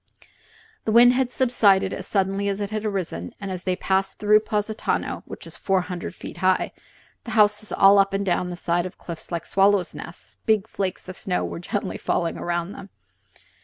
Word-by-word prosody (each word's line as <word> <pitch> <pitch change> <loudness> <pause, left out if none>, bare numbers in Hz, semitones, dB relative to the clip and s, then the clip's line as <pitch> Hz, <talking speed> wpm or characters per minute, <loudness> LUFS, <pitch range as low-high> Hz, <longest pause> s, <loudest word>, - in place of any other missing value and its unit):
The 220 - +1
wind 240 +2 +7
had 255 -1 0
subsided 200 -7 +3
as 190 - -6
suddenly 195 0 0
as 200 0 -2
it 205 0 -3
had 215 0 -3
arisen, 180 - -3
and 195 -1 -5
as 185 -1 -5
they 185 -1 +1
passed 190 +1 0
through 210 0 +5
Positano 215 0 -2
which - - -9
is - - -8
four 190 -1 +1
hundred 180 -1 -6
feet - - -9
high, 185 +1 +2 0.5
the - - -8
houses 210 0 +3
all 195 +1 +6
up 195 0 +3
and 195 0 -1
down 180 -1 0
the 175 - -5
side 175 0 0
of 185 - -12
a - - -47
cliff 170 0 -8
like 170 -1 -3
swallows' 195 -2 +3
nests - - -10
big 215 -3 +3
flakes 190 -2 -4
of 185 - -7
snow 180 -2 -1
were - - -5
gently 190 +2 -3
falling 170 -1 -1
around 175 +1 -2
them. 200 -1 -10
195 Hz, 200 wpm, -24 LUFS, 180-210 Hz, 0.5 s, wind